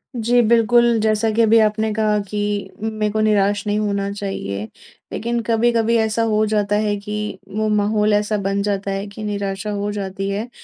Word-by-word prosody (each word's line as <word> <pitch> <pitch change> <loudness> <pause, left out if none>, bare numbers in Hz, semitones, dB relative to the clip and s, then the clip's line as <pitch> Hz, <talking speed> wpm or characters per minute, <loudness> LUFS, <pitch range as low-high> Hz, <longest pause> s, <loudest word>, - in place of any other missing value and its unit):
जी। 240 +1 +3
बिल्कुल, 235 +1 +4
जैसा 215 +1 +1
कि 225 +2 +1
अभी 225 0 +5
आपने 215 0 +1
कहा 215 -1 +1
कि 210 - -3 0.4
मेरे 215 -1 -1
को 215 - -1
निराश 205 -1 +2
नहीं 205 0 +1
होना 200 -1 -1
चाहिए, 195 - -4 0.5
लेकिन 235 +1 -2
कभी-कभी 230 0 +2
ऐसा 220 0 +1
हो 215 0 +2
जाता 205 -1 0
है 205 -1 0
कि 210 -1 -4 0.2
वो 215 0 0
माहौल 210 0 +2
ऐसा 210 +1 +1
बन 200 0 0
जाता 200 -1 -2
है 195 +1 -3
कि 205 +2 -9
निराशा 200 0 -3
हो 205 0 -2
जाती 195 -1 -4
है। 210 +4 -3
210 Hz, 180 wpm, -20 LUFS, 205-220 Hz, 0.5 s, अभी